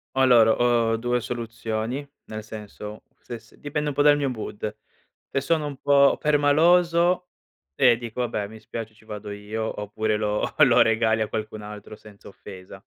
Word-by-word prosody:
Allora, 125 -4 +5
ho 120 -2 +2
2 120 +1 0
soluzioni, 115 +2 -4 0.2
nel 110 0 -7
senso 105 0 -9 0.2
se 120 -2 -8
se - - -23
dipende 150 0 -2
un 140 - -5
po' 145 - +3
dal 145 0 +6
mio 145 -2 -1
mood. 110 -2 -6 0.5
Se 135 - 0
sono 155 +2 0
un 145 -2 -6
po' 140 0 +4
permaloso, 170 +4 +3 0.4
eh, 120 - +4
dico: 120 +1 -5
"Vabbè, 110 -4 -2
mi 110 +1 -12
spiace 110 0 -7
ci 110 +1 -23
vado 105 -1 -7
io, 105 +2 -5
oppure 110 +1 -1
lo 105 0 -1
lo - - +5
regali 110 0 +1
a 110 - -1
qualcun 110 0 -5
altro 105 0 -9
senza 105 -1 -16
offesa." 95 -2 -12
115 Hz, 165 wpm, -24 LUFS, 110-140 Hz, 0.5 s, dal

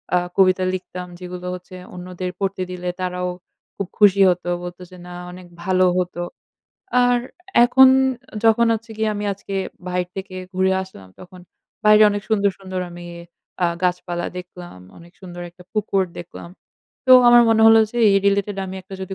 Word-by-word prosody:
আ - - +5 0.2
কবিতা 185 -1 +4
লিখতাম 180 -1 -6
যেগুলো 180 0 -7
হচ্ছে 180 +1 -12 0.2
অন্যদের 180 0 -6
পড়তে 195 -1 -2
দিলে 180 0 -4
তারাও 180 0 -2 0.5
খুব 200 - -4
খুশি 200 -2 +5
হতো 180 0 -2 0.2
বলতো 175 +1 -8
যে 180 - -12
না 180 - -9 0.2
অনেক 180 0 -12 0.2
ভালো 185 0 +2
হতো। 180 -1 -2 0.9
আর 245 0 +3 0.5
এখন 260 +2 +7 0.6
যখন 225 +1 +4
হচ্ছে 225 +1 -8
গিয়ে 220 0 0
আমি 205 0 -4
আজকে 195 0 -8 0.3
বাহির 180 0 -1
থেকে 190 -1 -7 0.2
ঘুরে 190 0 +2
আসলাম 100 - -13
তখন 185 0 -13 0.4
বাইরে 210 0 +7
অনেক 205 0 -3
সুন্দর 205 -2 +2
সুন্দর 185 -1 -5
আমি 175 0 -10 0.6
আ - - +4 0.2
গাছপালা 180 -1 -1
দেখলাম। 180 - -11 0.2
অনেক 170 +1 -16
সুন্দর 175 -2 -9
একটা 180 +1 -17
পুকুর 200 -3 0
দেখলাম। 170 0 -9 0.6
তো 255 - +7 0.2
আমার 240 0 +8
মনে 220 0 +4
হলো 225 0 +7
যে 240 - -9
এই 195 - +4
রিলেটেড 200 0 +1
আমি 190 - -7
একটা 190 - -11
যদি 190 0 -6
185 Hz, 165 wpm, -21 LUFS, 180-200 Hz, 0.9 s, আমার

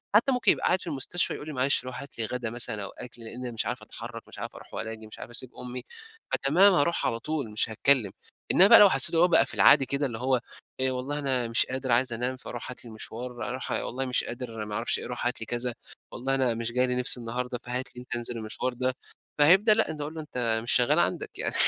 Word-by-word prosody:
حتى 260 +5 +5
ممكن 245 -5 +4
يبقى - - -1
قاعد 185 - +2
في - - -9
المستشفى 155 +4 -1
يقول 150 - -8
لي 155 - -5
معلش 130 0 +1
روْح 130 - -6
هات 140 - -11
لي 115 - +1
غَدا 120 0 -3
مثلًا 115 -3 -3
أو 100 - -6
أكْل 120 -1 -11
لإن 120 +3 -8
انا 120 - -4
مش 115 - -2
عارف - - -3
أتحرك، - - -9
مش - - -12
عارف - - -6
أروْح - - -13
ولا 110 +1 -4
آجي، 110 -1 -9
مش - - -12
عارف - - -8
أسيب 125 +1 -3
أمي، 125 0 -6 0.5
فتمام، 180 +9 +5
هاروْح 170 +1 +1
على 115 - -2
طول 140 -3 -3
مش 110 - 0
هاتكلم، 110 -1 +3 0.4
إنما 190 - +7
بقى - - +9
لو 205 - +9
حسيته 135 +2 +3
هو 175 +2 +6
بقى 165 - +5
في - - -9
العادي 140 -2 +6
كده 140 +3 -1
اللي 120 -4 -4
هو 130 -1 +1 0.4
إيه، 130 0 +1
والله 130 +3 -3
أنا 130 -4 -1
مش 115 0 +2
قادر 130 -1 -3
عايز 120 0 +2
أنام 125 +3 -2
فروْح 120 -1 -7
هات 125 - -10
لي - - -9
المشوار، 115 +3 -7
لأ، 120 - -3
روْح 130 - -5
والله 130 +2 -2
مش 125 -1 0
قادر 115 -3 -6
ما 105 - -5
اعرفش - - -1
إيه - - -7
روْح - - -5
هات 125 - -2
لي - - -3
كذا، 120 +1 -2 0.4
والله 135 +2 -1
أنا 130 -3 +1
مش 115 0 -3
جاي 125 +1 +2
لي 125 - -1
نِفْس 125 0 +3
النهاردة 120 +1 -4
فهات 125 +1 -5
لي 125 - -8
أنت 125 - -5
انْزل 120 0 -1
المشوار 115 +3 -3
ده، 130 +1 -1 0.4
فهيبدأ 190 +9 +7
لأ 225 - +2
أنت 150 -1 -6
اقول 150 +2 -4
له 160 - -4
أنت 120 -6 0
مش 120 - -1
شغال 125 -1 +3
عندك - - -1
يعني، - - -1
125 Hz, 255 wpm, -27 LUFS, 120-140 Hz, 0.5 s, بقى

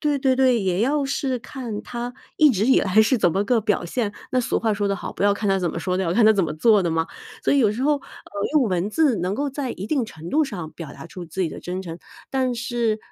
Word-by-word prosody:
对 295 -2 +1
对 265 -1 +2
对， 255 -2 +3
也 185 0 0
要 280 +5 +1
是 270 -1 -1
看 235 -4 -6
它 245 0 -5 0.2
一 305 -1 +7
直 210 -2 0
以 260 - +5
来 200 +3 +4
是 240 +3 +2
怎 175 - +3
么 195 +5 0
个 230 +1 +2
表 210 -4 0
现。 210 +4 -1 0.2
那 255 - +3
俗 240 - 0
话 220 -2 +1
说 205 0 -1
得 200 - 0
好： - - -6
“不 - - -5
要 200 0 +4
看 205 0 -3
他 195 -1 +3
怎 175 -2 -1
么 - - -5
说 180 +2 -2
的， - - +1
要 170 - -1
看 225 +1 +4
他 220 - +7
怎 200 -3 +1
么 155 -3 -2
做 210 +5 +4
的 170 - 0
嘛。” 165 0 0 0.4
所 - - +3
以 280 - +4
有 240 - +5
的 205 - 0
时 245 - -3
候， 295 +2 +3
呃， - - -10 0.5
用 300 - +5
文 185 -3 0
字 275 +1 +2
能 180 +3 -1
够 285 +3 -2
在 270 -2 -3
一 195 - -6
定 280 -1 +1
程 160 -4 -9
度 315 - +3
上 185 - -5
表 165 -3 -9
达 - - -10
出 175 +1 -9
自 185 +4 -3
己 165 - -1
的 - - -8
真 180 +1 -4
诚， 170 -2 -7 0.3
但 260 -2 0
是， 235 -3 -1
215 Hz, 310 characters per minute, -23 LUFS, 185-260 Hz, 0.5 s, 一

